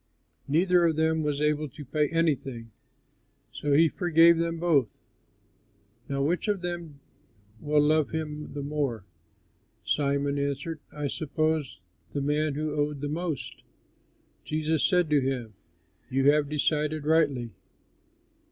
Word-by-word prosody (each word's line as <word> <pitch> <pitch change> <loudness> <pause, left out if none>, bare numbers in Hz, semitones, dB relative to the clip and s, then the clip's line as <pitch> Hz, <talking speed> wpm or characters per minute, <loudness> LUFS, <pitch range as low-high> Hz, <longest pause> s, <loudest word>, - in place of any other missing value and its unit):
Neither 175 +4 +3
of 160 - 0
them 160 0 +1
was 150 -1 -1
able 150 0 0
to 145 +2 -11
pay 150 +3 0
anything; 135 -8 -1 0.8
so 145 -1 -1
he 160 +3 +6
forgave 170 -1 +4
them 165 0 -1
both. 160 -8 +1 1.1
Now 140 0 -1
which 170 +8 0
of 205 -3 0
them 170 -5 -5 0.6
will 150 +2 +2
love 155 0 +2
him 150 -1 -5
the 145 - -4
more?" 140 -8 -2 0.8
Simon 140 0 0
answered, 140 +3 -3
"I 150 -1 -5
suppose 155 - -1 0.3
the 140 - -1
man 150 +1 0
who 155 0 -2
owed 145 -1 -1
the 145 - -3
most." 160 -3 -4 0.8
Jesus 155 0 0
said 180 -3 +3
to 145 -2 +4
him, 130 -4 -3 0.6
"You 135 +2 +4
have 150 -1 +1
decided 150 0 0
rightly." 145 -7 +2
150 Hz, 130 wpm, -27 LUFS, 140-160 Hz, 1.1 s, he